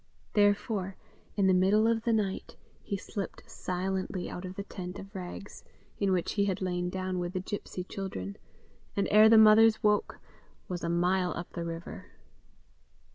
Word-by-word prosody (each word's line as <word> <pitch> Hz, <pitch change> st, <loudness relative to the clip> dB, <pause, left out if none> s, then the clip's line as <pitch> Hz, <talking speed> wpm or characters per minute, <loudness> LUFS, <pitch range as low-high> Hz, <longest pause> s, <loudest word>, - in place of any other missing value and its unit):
Therefore, 205 Hz, -2 st, +2 dB, 0.4 s
in 200 Hz, -, +2 dB
the 190 Hz, -, +5 dB
middle 195 Hz, +4 st, +4 dB
of 225 Hz, 0 st, +2 dB
the 235 Hz, -, +2 dB
night, 205 Hz, -4 st, -1 dB, 0.3 s
he 200 Hz, -, -3 dB
slipped 200 Hz, 0 st, -6 dB
silently 185 Hz, +1 st, -3 dB
out 180 Hz, -, -6 dB
of 185 Hz, +1 st, -7 dB
the 200 Hz, -, -4 dB
tent 180 Hz, -2 st, -7 dB
of 195 Hz, +1 st, -10 dB
rags, 190 Hz, +1 st, -8 dB, 0.4 s
in 200 Hz, -2 st, +2 dB
which 180 Hz, -2 st, +1 dB
he 200 Hz, -1 st, +1 dB
had 195 Hz, -1 st, -1 dB
lain 180 Hz, -1 st, -1 dB
down 185 Hz, 0 st, -2 dB
with 175 Hz, 0 st, -3 dB
the 185 Hz, -, -1 dB
gipsy 185 Hz, -1 st, -5 dB
children, 180 Hz, -, -5 dB, 0.6 s
and 200 Hz, -, +1 dB
ere 215 Hz, +1 st, +8 dB
the 225 Hz, -, +7 dB
mothers 220 Hz, +1 st, +7 dB
woke, 210 Hz, 0 st, +2 dB, 0.5 s
was 180 Hz, -1 st, -4 dB
a 170 Hz, -, -1 dB
mile 180 Hz, 0 st, +1 dB
up 170 Hz, -, -6 dB
the 170 Hz, -, -4 dB
river. 165 Hz, 0 st, -7 dB
190 Hz, 170 wpm, -30 LUFS, 180-205 Hz, 0.6 s, ere